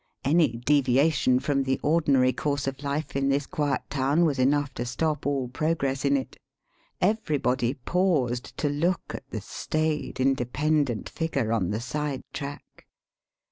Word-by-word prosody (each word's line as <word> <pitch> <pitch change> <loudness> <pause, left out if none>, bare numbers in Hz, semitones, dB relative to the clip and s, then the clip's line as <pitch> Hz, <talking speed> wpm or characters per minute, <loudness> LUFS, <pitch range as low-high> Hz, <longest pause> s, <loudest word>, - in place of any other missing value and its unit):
Any 155 -2 +3
deviation 130 +2 +3
from 140 0 0
the 130 -1 0
ordinary 140 -5 +3
course 145 -1 -1
of 135 0 -4
life 145 +1 -3
in 140 0 +1
this 140 +1 +1
quiet 150 -4 -1
town 145 +5 +2
was 145 -4 0
enough 140 +1 +2
to 120 - -4
stop 150 +3 -1
all 135 -3 0
progress 135 0 -1
in 140 0 +3
it. 130 - -6 0.6
Everybody 145 - +1
paused 135 -6 0
to 150 - 0
look 165 +5 -1
at - - -8
the - - -4
staid, 155 -3 -2
independent 135 0 +1
figure 140 -9 -2
on 95 -6 0
the 105 - -1
side 145 +2 -3
track. 140 0 -8
140 Hz, 145 wpm, -26 LUFS, 130-150 Hz, 0.6 s, Any